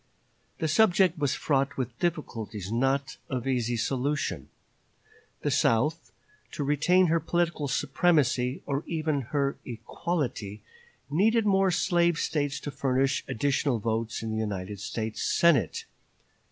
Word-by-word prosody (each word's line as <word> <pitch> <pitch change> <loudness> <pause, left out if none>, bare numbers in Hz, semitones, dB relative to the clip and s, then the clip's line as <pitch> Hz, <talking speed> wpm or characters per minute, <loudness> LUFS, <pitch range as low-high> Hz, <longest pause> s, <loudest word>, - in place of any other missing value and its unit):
The 160 - -1
subject 180 -1 +3
was 140 -2 +1
fraught 140 -1 0
with 125 -2 -4
difficulties 115 - -3
not 135 +3 0
of 130 -1 -3
easy 120 -2 0
solution. 135 +5 -1 0.9
The - - 0
South, 140 +9 +1 0.4
to 145 - -3
retain 155 +6 +3
her 165 0 +2
political 170 -2 -1
supremacy, 135 -2 +1
or 140 +2 -2
even 155 -3 -1
her 140 -1 0
equality, 120 - -4 0.5
needed 220 +8 +3
more 195 -1 +3
slave 175 -1 +2
States 145 -4 -1
to 145 - -5
furnish 135 0 0
additional 140 +1 0
votes 115 +1 -2
in 110 - -3
the 110 0 -1
United 100 -2 -4
States 110 +2 -4
Senate. 145 - +2
140 Hz, 125 wpm, -28 LUFS, 120-165 Hz, 0.9 s, subject